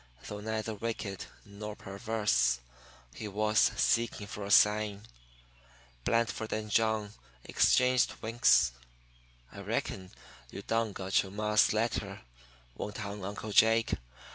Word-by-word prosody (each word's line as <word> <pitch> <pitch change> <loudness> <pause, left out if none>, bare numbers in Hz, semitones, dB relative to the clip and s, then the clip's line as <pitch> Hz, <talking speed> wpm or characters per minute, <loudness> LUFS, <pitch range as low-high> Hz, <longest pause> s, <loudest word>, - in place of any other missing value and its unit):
Though 105 - -6
neither 110 +1 -3
wicked 105 -2 -5 0.2
nor 105 +1 -8
perverse, 95 - 0 0.5
he 110 - -6
was 105 +1 +1
seeking 115 -3 +2
for 105 0 -7
a - - -6
sign. 105 0 +4 1.0
Blandford 115 -1 0
and 110 -1 -4
John 110 -2 +1 0.3
exchanged 125 0 +3
winks. 115 - +3 0.8
"I - - -10
reckon 95 -1 -3 0.4
you - - -8
done 115 -2 -1
got 95 0 +1
you 95 - -8
ma's 105 +2 +2
letter," 105 -3 -2 0.5
went 105 - -6
on 100 0 -6
Uncle 105 +2 -5
Jake. 115 +2 +4
105 Hz, 115 wpm, -31 LUFS, 100-110 Hz, 1.0 s, sign